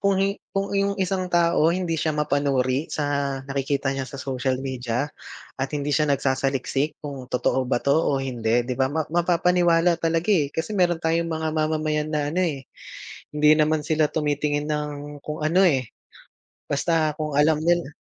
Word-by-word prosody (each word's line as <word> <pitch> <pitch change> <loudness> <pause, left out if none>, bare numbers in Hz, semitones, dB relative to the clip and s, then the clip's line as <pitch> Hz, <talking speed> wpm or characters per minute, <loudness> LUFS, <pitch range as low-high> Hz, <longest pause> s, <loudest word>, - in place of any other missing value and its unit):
kung 200 -1 +2
hi 195 +1 +1 0.2
kung 195 0 -2
iyong 200 0 +1
isang 185 0 -1
tao 170 -2 +3
hindi 175 -3 -1
siya 155 - 0
mapanuri 140 -2 +1
sa 150 - -1 0.4
nakikita 140 0 -1
niya 135 -1 -3
sa 135 +2 -8
social 130 -1 -2
media 130 0 -2 0.5
at 135 0 -2
hindi 145 -1 -2
siya 155 - +3
nagsasaliksik, 135 +1 0
kung 140 -4 -7
totoo 130 +1 +1
ba 120 - +1
to 140 - +2
o 145 -4 +1
hindi 120 -3 0
'di 125 +1 -3
ba, 130 0 +2
ma 160 0 0
mapapaniwala 175 0 +3
talaga, 165 +3 0
eh. 150 -8 +2
Kasi 160 +6 -3
meron 175 -3 +2
tayong 165 0 0
mga 160 0 -2
mamamayan 155 -1 0
na 150 -1 0
ano, 180 - 0
eh, 140 -6 -3 0.7
hindi 150 0 +5
naman 155 0 +2
sila 155 0 +2
tumitingin 150 -1 -1
ng 150 -1 -2 0.3
kung 150 0 -5
ano, 170 +5 +3
eh, 130 -7 +1 0.8
basta 155 +1 +1
kung 150 -2 -3
alam 150 +1 +4
nila 170 -3 +1
150 Hz, 170 wpm, -24 LUFS, 135-165 Hz, 0.8 s, hindi